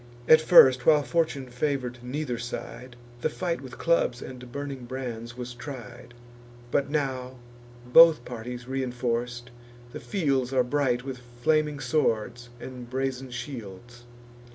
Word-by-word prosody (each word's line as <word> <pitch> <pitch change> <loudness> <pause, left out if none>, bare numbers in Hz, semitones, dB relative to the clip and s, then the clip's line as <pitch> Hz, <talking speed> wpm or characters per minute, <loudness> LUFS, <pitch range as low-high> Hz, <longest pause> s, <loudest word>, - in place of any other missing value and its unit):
At 155 0 +8
first, 130 -7 +7
while 150 -2 +6
fortune 145 -1 0
favour'd 125 -2 -2
neither 125 -1 -3
side, 120 +1 -7 0.3
The 155 - +1
fight 170 0 -3
with 130 -2 -10
clubs 165 -7 +1
and 125 -1 -9
burning 140 -2 -6
brands 120 -2 -6
was 125 0 -6
tried; 120 -1 -9 0.6
But 140 - +1
now, 130 -4 -2 0.5
both 155 +1 +7
parties 120 +1 -7
reinforc'd, 120 -2 -3 0.4
the - - -7
fields 135 - -1
Are 130 -1 +4
bright 125 -2 0
with 135 -2 -6 0.2
flaming 155 -1 +2
swords 120 -5 -1
and 125 -1 -9
brazen 130 0 -3
shields. 120 -1 -8
125 Hz, 130 wpm, -27 LUFS, 120-140 Hz, 0.6 s, At